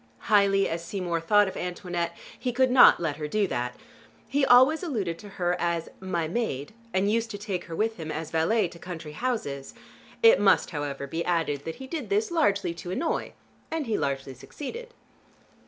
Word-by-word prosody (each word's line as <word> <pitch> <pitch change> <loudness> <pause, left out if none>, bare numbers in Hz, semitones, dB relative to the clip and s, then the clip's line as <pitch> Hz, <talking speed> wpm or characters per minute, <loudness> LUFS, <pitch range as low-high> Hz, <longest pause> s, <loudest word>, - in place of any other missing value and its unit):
Highly 195 -1 +5
as 165 +1 -3
Seymour 175 -2 -2
thought 205 +4 +4
of 190 - -5
Antoinette 175 -1 -3 0.2
he 250 0 -1
could 255 +1 +2
not 255 - +8
let 155 -4 -2
her 150 -1 -4
do 205 +6 +1
that. 125 -7 -3 0.5
He 280 0 +1
always 260 +5 +6
alluded 205 - -2
to 205 - -10
her 175 -1 +1
as 170 -1 -1
"my 175 -4 -2
maid," 165 - -3 0.2
and 195 +1 +1
used 230 +1 0
to 205 - -5
take 200 -3 -4
her 165 - -6
with 220 +4 0
him, 160 -2 -5
as 155 0 -5
valet, 180 +6 +2
to 170 - -13
country 165 -4 -7
houses. 150 - -3 0.5
It 460 +2 +8
must, - - +4
however, 145 -3 -4
be 165 +5 -3
added 165 -5 -1
that 165 - -4
he 265 - -9
did 310 +2 -5
this 420 0 +1
largely 200 - +1
to 170 +1 -8
annoy, 320 - -2 0.4
and 320 -2 -2
he 225 -3 -1
largely 135 -3 -2
succeeded. 455 - -8
185 Hz, 190 wpm, -27 LUFS, 165-230 Hz, 0.5 s, not